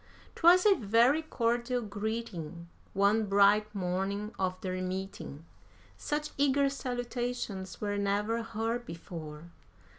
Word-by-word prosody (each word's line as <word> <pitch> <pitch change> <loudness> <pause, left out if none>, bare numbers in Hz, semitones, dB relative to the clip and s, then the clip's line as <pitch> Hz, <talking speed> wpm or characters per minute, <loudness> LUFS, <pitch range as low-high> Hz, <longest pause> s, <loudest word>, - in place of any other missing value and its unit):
'Twas 355 +3 +6
a 415 - +8
very 240 - +3
cordial 240 -4 0
greeting, 205 -6 -5 0.3
one 205 +2 +3
bright 200 +2 +5
morning 195 +3 -2
of 185 -1 -1
their 185 -1 -3
meeting; 185 -5 -5 0.5
Such 300 0 -3
eager 280 0 +3
salutations 245 -6 -4
were 205 -1 -1
never 205 +3 0
heard 230 +1 -2
before. 165 -3 -8
210 Hz, 110 wpm, -31 LUFS, 190-245 Hz, 0.5 s, a